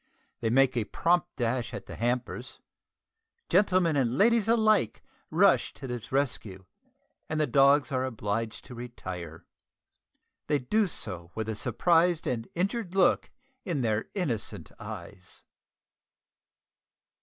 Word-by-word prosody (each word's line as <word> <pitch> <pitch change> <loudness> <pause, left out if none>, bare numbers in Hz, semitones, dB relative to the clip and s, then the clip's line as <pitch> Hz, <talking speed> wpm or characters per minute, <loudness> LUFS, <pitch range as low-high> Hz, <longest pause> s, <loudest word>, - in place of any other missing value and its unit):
They 115 - 0
make 135 +2 +4
a 115 -3 0
prompt 175 +8 +1
dash 120 0 -1
at - - -7
the - - -8
hampers. 120 +1 -2 0.9
Gentlemen 185 -4 +3
and 130 -2 +1
ladies 230 +2 +4
alike 215 - +2 0.3
rush - - +3
to 135 - -9
the 125 -3 -4
rescue, 115 -9 -2 0.6
and 155 - -1
the 155 - +3
dogs 140 +1 +4
are 130 -1 0
obliged 115 -2 -3
to - - -10
retire. 95 -9 -7 1.0
They 150 - +2
do 200 - +1
so 85 - -5
with 110 -1 -3
a 110 - -2
surprised 165 - +2
and 115 -2 -2
injured 195 +1 -2
look 190 -2 +3 0.3
in 170 - -2
their 110 -2 0
innocent 140 - -3
eyes. 90 - -9
130 Hz, 125 wpm, -28 LUFS, 115-175 Hz, 1.0 s, make